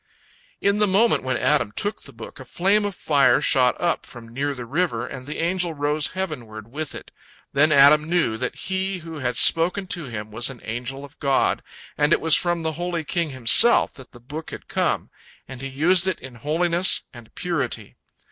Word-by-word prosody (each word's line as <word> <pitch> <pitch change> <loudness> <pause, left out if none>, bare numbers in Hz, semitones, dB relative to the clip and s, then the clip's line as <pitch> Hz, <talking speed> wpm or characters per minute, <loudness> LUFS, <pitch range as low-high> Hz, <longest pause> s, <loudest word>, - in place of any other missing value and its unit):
In 200 +1 +1
the 210 - +3
moment 205 +5 +2
when 130 0 -1
Adam 145 -8 +1
took 205 +1 -3
the - - -14
book, 115 -1 -11
a 130 - -10
flame 200 +9 +1
of 200 -2 -4
fire 140 -6 +3
shot 125 -3 +2
up 175 -1 -1
from 115 -2 -12
near 140 +2 -2
the 125 -2 -7
river, 165 +8 -1
and 130 -1 -9
the 150 - -5
angel 175 0 0
rose 145 +1 +1
heavenward 115 - -6
with 155 +2 -5
it. - - -10 0.4
Then 150 +3 +3
Adam 150 +2 +6
knew 170 -10 +1
that 125 +2 -4
he 190 0 -3
who 160 -2 -7
had 125 -2 -2
spoken 180 +4 +3
to 170 -4 -6
him 110 -3 -7
was 115 +4 0
an 130 -3 -10
angel 125 +5 -5
of 140 - -19
God, 135 -2 +1 0.4
and 145 +2 +3
it - - +3
was 160 -1 +5
from 175 -1 0
the 160 - -1
Holy 175 -2 -2
King 170 +1 -2
Himself 130 - +6
that 130 - -14
the 120 - -15
book 150 +7 -8
had - - -10
come, - - -1 0.4
and 130 -1 -9
he 135 - -4
used 170 +7 +2
it 190 - -1
in 130 -1 -11
holiness 170 +8 +1
and 120 -3 -15
purity. 135 - -3
150 Hz, 200 wpm, -22 LUFS, 130-175 Hz, 0.4 s, Adam